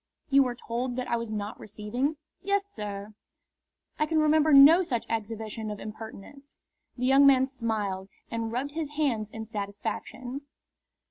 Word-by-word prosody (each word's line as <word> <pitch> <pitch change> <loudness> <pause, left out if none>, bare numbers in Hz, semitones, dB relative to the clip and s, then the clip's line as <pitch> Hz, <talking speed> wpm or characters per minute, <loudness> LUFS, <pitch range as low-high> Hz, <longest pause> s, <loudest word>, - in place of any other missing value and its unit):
"You 275 0 +7
were 250 -2 0
told 245 +1 -3
that 255 0 -3
I - - +1
was 230 -1 -3
not 210 0 -4
receiving?" 235 +8 -3 0.2
"Yes, 400 +1 +1
sir." 210 - -7 0.9
"I 305 - +2
can 320 +1 0
remember 310 0 +4
no 290 +6 +9
such 245 -10 -2
exhibition 220 0 -3
of 210 -1 -5
impertinence." 225 +6 -10 0.4
The 250 - -1
young 270 +2 +6
man 265 -1 +6
smiled 215 -7 -3 0.2
and 230 -1 -2
rubbed 260 +5 -2
his 315 -1 -3
hands 235 -9 0
in 220 0 -7
satisfaction. 220 +5 -5
240 Hz, 150 wpm, -28 LUFS, 215-280 Hz, 0.9 s, no